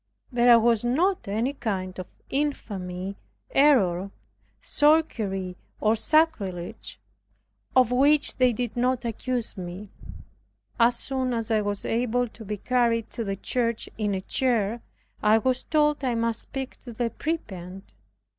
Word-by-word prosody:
There 240 -1 +6
was 230 -1 +2
not 335 - +1
any 225 +7 -1
kind 190 -8 -4
of 185 - -6 0.2
infamy, 195 -10 -3 0.3
error, 200 -11 +3 0.5
sorcery, 215 - +1 0.2
or 215 +1 +3
sacrilege, 220 - 0 0.8
of 255 -2 +5
which 285 +4 +4
they 255 -1 +4
did 235 -1 -3
not 250 0 0
accuse 235 +1 -2
me. 185 +2 -7 0.9
As 235 +1 +5
soon 260 -2 -2
as 230 0 -3
I 215 -1 +3
was 205 -1 -3
able 245 +1 0
to 225 - -12
be 210 0 -4
carried 235 0 +1
to 230 - -3
the 195 -2 -2
church 230 +2 -2
in 210 -2 -1
a 190 - -3
chair, 230 -1 0 0.4
I 210 +1 +5
was 255 +3 0
told 300 -2 +2
I 250 -3 0
must 230 0 0
speak 265 -1 -6
to 240 - -11
the 230 0 -2
prebend. 195 - -5
230 Hz, 135 wpm, -26 LUFS, 205-255 Hz, 0.9 s, There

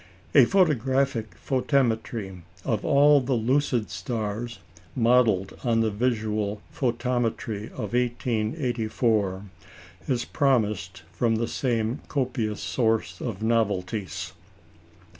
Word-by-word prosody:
A 135 -4 +8
photographic 135 - +1
photometry 120 -7 -1 0.2
of 110 -3 0
all 145 -1 +5
the 130 0 0
lucid 120 -1 +1
stars, 110 +3 -4 0.4
modelled 115 -5 +3
on 115 -2 +2
the 110 -1 +1
visual 105 -2 -1
photometry 120 -4 -1
of 110 -4 -5
1884, 115 - 0 0.6
is 120 -3 0
promised 105 - 0
from 115 -2 +1
the 115 +1 -1
same 115 -1 -1
copious 125 -6 -2
source 105 -3 0
of 110 -4 -4
novelties. 105 -3 -1
115 Hz, 95 wpm, -26 LUFS, 105-125 Hz, 0.6 s, A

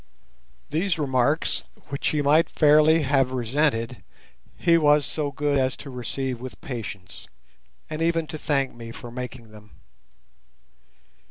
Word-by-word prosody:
These 175 +3 0
remarks, 140 +1 +1 0.2
which 140 0 -2
he 150 -1 +1
might 150 +4 +4
fairly 155 +1 +5
have 135 -2 +2
resented, 125 -1 0 0.5
he 170 -1 +4
was 150 -2 +4
so 150 -2 -2
good 140 0 0
as 130 0 0
to 140 - -9
receive 125 0 -4
with 130 0 -8
patience, 105 - -7 0.6
and 155 +1 -5
even 165 0 +1
to 155 0 -7
thank 140 -3 0
me 115 -1 -9
for 120 +1 -9
making 120 -2 -7
them. 105 0 -15
140 Hz, 135 wpm, -25 LUFS, 125-155 Hz, 0.6 s, fairly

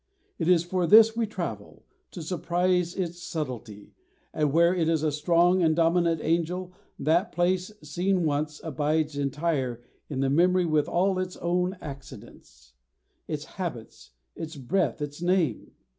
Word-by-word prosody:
It 165 - -1
is 175 -2 +4
for 175 0 -1
this 225 +2 +7
we 230 -1 0
travel, 215 - -6 0.2
to 170 - -8
surprise 180 +1 0
its 175 -2 -4
subtlety; 120 -11 -6 0.4
and 150 -2 +1
where 170 +3 +4
it 165 -3 +1
is 160 -2 +1
a 155 - +1
strong 175 +4 +3
and 160 -2 +3
dominant 165 -1 +2
angel, 175 +3 -1 0.2
that 170 +7 +1
place, 180 +2 0
seen 180 +5 0
once, 150 0 -1
abides 155 0 -1
entire 140 -4 -1 0.3
in 135 -3 -2
the 135 - +1
memory 180 +4 +3
with 155 -3 +1
all 185 +2 +1
its 185 0 -4
own 180 +2 -1
accidents, 100 - -12 0.5
its - - -4
habits, - - -7 0.3
its 160 0 -7
breath, 150 +4 -1
its 145 +2 -7
name. 175 - 0
170 Hz, 145 wpm, -27 LUFS, 150-180 Hz, 0.5 s, this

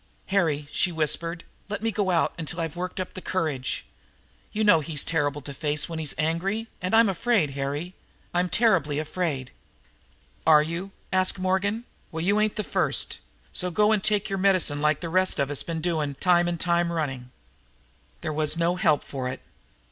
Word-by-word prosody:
"Harry," 160 -7 +1
she 180 - +1
whispered, 165 +2 -1 0.3
"let 210 +1 -4
me 225 - +1
go 205 -3 0
out 170 -3 +2
till 170 - -3
I've 165 -1 -3
worked 180 +1 -4
up 185 - -3
my 185 - -6
courage. 155 -10 -2 0.7
You 215 - -1
know 205 -6 +6
he's 150 -1 0
terrible 145 -3 0
to 140 +1 -7
face 150 +1 -1
when 165 -1 -5
he's 155 -3 0
angry. 180 +8 -1 0.2
And 185 +4 +1
I'm 225 0 +6
afraid, 195 - +1
Harry 140 +6 -3 0.4
I'm 180 +1 +1
terribly 165 -9 +3
afraid!" 155 -4 -2 0.9
"Are 155 -1 +6
you?" 170 +5 -4 0.2
asked 185 +1 +3
Morgan. 190 +4 0 0.3
"Well, 160 0 -3
you 200 +4 +3
ain't 215 0 +1
the 210 - -1
first. - - +1 0.5
Go 210 +4 +4
and 210 -3 +2
take 210 -1 +1
your 195 -1 -2
medicine 185 -7 +3
like 150 -1 +2
the 170 - -3
rest 185 +2 +2
of 140 0 0
us 145 - +2
have 165 -1 -4
done, 155 -5 -1
time 175 +2 +3
and 170 -1 -2
time 170 0 +2
running." 135 -7 -3 0.9
There 155 -2 -3
was 155 +1 +1
no 170 +2 +1
help 150 -5 +3
for 130 -2 -4
it. 130 +1 -4
170 Hz, 180 wpm, -26 LUFS, 150-185 Hz, 0.9 s, know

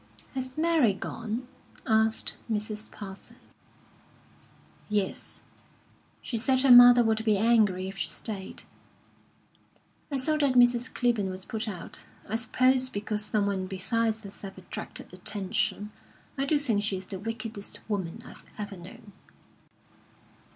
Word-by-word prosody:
"Has 260 0 -5
Mary 310 - +3
gone?" 230 +4 -5 0.4
asked 220 -1 +2 0.2
Mrs. 210 0 -3
Parsons. 195 -2 -8 1.5
"Yes. 205 -2 0 0.8
She 235 - -3
said 260 +3 +3
her 270 -1 +5
mother 245 0 +9
would 220 -1 +1
be 215 -2 +3
angry 205 -4 +3
if 195 0 -8
she - - -1
stayed." 200 -4 -4 1.5
"I 280 - 0
saw 305 +4 +3
that 280 -4 +2
Mrs. 245 0 +4
Clibborn 235 -6 0
was 185 0 -5
put 225 +1 -4
out. 185 -5 -2 0.2
I 215 - -2
suppose 255 +2 +2
because 210 -1 -3
someone 200 -3 -1
besides 220 +4 0
herself 195 -1 -10
attracted 185 - -8
attention. 205 +2 0 0.4
I 275 - 0
do 295 +2 +3
think 235 -8 +1
she 205 -2 -1
is 185 - -6
the 190 0 -7
wickedest 220 -1 -5
woman 200 -1 -3
I've - - -12
ever 205 -2 -6
known." 205 +5 -12
220 Hz, 130 wpm, -28 LUFS, 200-245 Hz, 1.5 s, mother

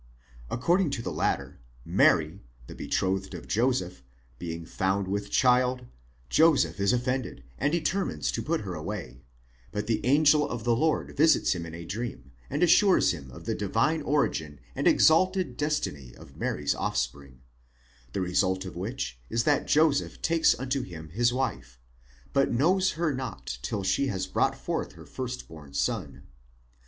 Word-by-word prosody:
According 170 +8 +2
to 115 - -5
the - - -3
latter - - -1 0.3
Mary, 80 +5 +3 0.2
the - - -10
betrothed 95 0 -2
of - - -9
Joseph, 105 - 0 0.4
being 85 -1 -5
found 95 +2 -1
with 100 +1 -2
child, 125 +1 +3 0.4
Joseph 140 - +3
is 100 +2 +3
offended, 125 +1 -2 0.2
and 140 +3 +1
determines 170 +4 -1
to - - -3
put 165 +1 -1
her 95 -3 -5
away; 65 -5 -6 0.5
but 105 - -3
the 110 -2 -1
angel 145 +3 +4
of 120 -3 -4
the 120 0 +2
Lord 155 +5 0
visits 155 +1 +4
him 85 -2 -5
in 80 - -8
a 85 0 -8
dream, 95 - -5 0.2
and - - 0
assures 190 +3 +5
him 70 -7 -7
of - - -12
the - - -1
divine 160 +1 0
origin 80 - -1 0.2
and - - 0
ex - - +6
alted 185 +3 +2
destiny 75 - -2
of - - -15
Mary's 75 -1 -1
offspring; 65 +1 -3 0.7
the - - -1
result 95 +1 +1
of 95 - -8
which 90 - -4
is 115 0 +1
that 145 +2 +2
Joseph 155 -2 +2
takes 165 0 +3
unto 130 +1 -1
him 80 -8 -9
his 120 +8 +2
wife: 125 - -3 0.5
but - - +2
knows 185 +10 +2
her 160 -2 0
not 120 - -5
till 105 - -3
she 115 +9 +1
has 95 -6 -2
brought - - 0
forth - - -3
her - - -13
first 125 -1 -6
born 75 -3 -12
son. 70 0 -2
115 Hz, 160 wpm, -27 LUFS, -, 0.7 s, ex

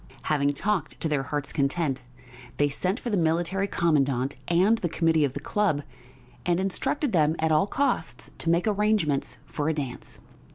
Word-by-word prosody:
Having 145 -2 +1
talked 190 +4 -2
to - - -1
their 150 -3 +1
hearts' 140 +1 -4
content, 140 -1 0 0.6
they 145 0 +3
sent 185 - -1
for 240 - -4
the 205 - +2
Military 175 +4 +1
Commandant 140 -7 +1
and 190 +7 +3
the 175 - -1
committee 160 -1 +2
of 135 -3 0
the 145 - -4
club, 160 -2 0 0.6
and 175 0 +1
instructed 265 +9 -1
them 155 -4 +3
at 160 0 +1
all 155 +5 +3
costs 280 +7 -1
to 165 - -1
make 170 +1 +3
arrangements 205 -9 +1
for 145 +1 -2
a 160 - 0
dance. 135 -5 -6
160 Hz, 170 wpm, -26 LUFS, 145-195 Hz, 0.6 s, they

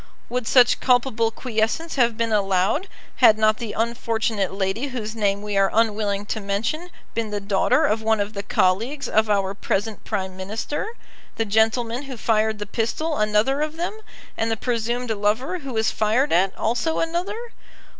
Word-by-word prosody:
Would 245 -2 -2
such 245 -2 +5
culpable 245 -3 +2
quiescence 230 +8 -2
have 235 -4 +2
been 230 -1 0
allowed 195 - +1 0.3
had 215 - +6
not 215 0 +3
the 230 -4 -4
unfortunate 225 -3 -1
lady 195 +7 -1
whose 230 -4 -5
name 200 -2 0
we 210 -1 -3
are 195 0 +4
unwilling 210 -2 +1
to 220 - -3
mention 225 - -2 0.2
been 225 -1 -2
the 205 0 -2
daughter 200 -1 +2
of 215 +1 +1
one 220 0 +2
of 205 +1 -2
the 200 - -3
colleagues 220 +9 0
of 220 0 +2
our 195 -2 +1
present 205 +1 -2
Prime 190 -3 -3
Minister, 215 - -4 0.5
the 225 - 0
gentleman 225 +3 +1
who 265 -3 -7
fired 220 -1 +1
the 205 - -5
pistol 240 +10 -2
another 215 +7 +2
of 305 +1 -2
them, 350 +5 -2 0.4
and 225 - -1
the 225 - 0
presumed 240 +1 -1
lover, 220 - 0
who 275 -4 -7
was 220 -1 +1
fired 220 +7 +1
at, 185 +2 +2
also 240 +8 0
another? 395 +8 -3
220 Hz, 170 wpm, -23 LUFS, 205-250 Hz, 0.5 s, had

